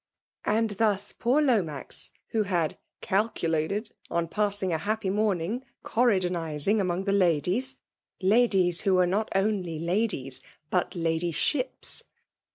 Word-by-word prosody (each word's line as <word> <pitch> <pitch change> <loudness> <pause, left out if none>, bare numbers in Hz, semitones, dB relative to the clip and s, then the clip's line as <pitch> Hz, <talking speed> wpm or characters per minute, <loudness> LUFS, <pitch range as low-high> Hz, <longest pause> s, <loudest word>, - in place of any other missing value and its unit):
'* - - -26
And 225 -1 +1
thus 205 -2 +1
poor 260 +6 +2
Lomax, 185 - 0 0.2
who 220 - +1
had 175 -6 -1 0.2
"caku 205 -3 0
lated 165 +7 -1 0.2
on 170 0 0
passing 205 -1 0
f^ 160 - 0
happy 210 +1 -1
monung, 205 +1 0 0.2
Oesrydon 210 -7 +2
izing 165 +4 0
among 180 0 -1
the 200 - 0
ladies, 185 - +2 0.3
( - - -62
ladies 190 -4 +4
who 195 -2 +3
were 180 0 +4
JMt 200 +5 0
only 195 -5 0
ladies, 170 - -1 0.3
but 180 0 0
ladydbips 170 - 0
195 Hz, 135 wpm, -27 LUFS, 170-215 Hz, 0.3 s, ladies